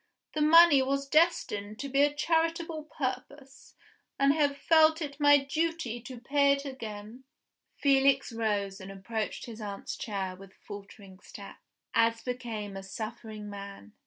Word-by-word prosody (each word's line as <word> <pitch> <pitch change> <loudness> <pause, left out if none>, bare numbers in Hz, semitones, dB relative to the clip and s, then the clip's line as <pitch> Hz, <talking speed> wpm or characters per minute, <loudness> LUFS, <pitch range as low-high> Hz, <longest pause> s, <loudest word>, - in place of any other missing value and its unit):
The 305 - -1
money 320 -2 +7
was 275 +1 -1
destined 215 -10 +1
to 275 +1 -6
a 285 +1 +5
charitable 325 +1 -1
purpose; 275 -1 -6 0.4
and 275 0 +4
I - - -4
have 285 -2 +1
felt 315 0 +4
it 290 -3 -6
my 290 0 +7
duty 285 -3 -2
to 245 +1 -9
pay 280 +3 +3
it 280 0 -4
again." 225 -2 -8 0.5
Felix 275 -2 +3
rose 205 -4 -2
and 190 +1 -8
approached 215 +3 -4
his 225 -2 -9
aunt's 200 -1 -6
chair 195 -4 -4
with 195 +1 -15
faltering 200 -2 -12
steps, - - -12 0.3
as 230 0 +2
became 230 -5 -5
a 195 - -6
suffering 215 +1 -7
man. 200 - -9
255 Hz, 145 wpm, -29 LUFS, 210-290 Hz, 0.5 s, money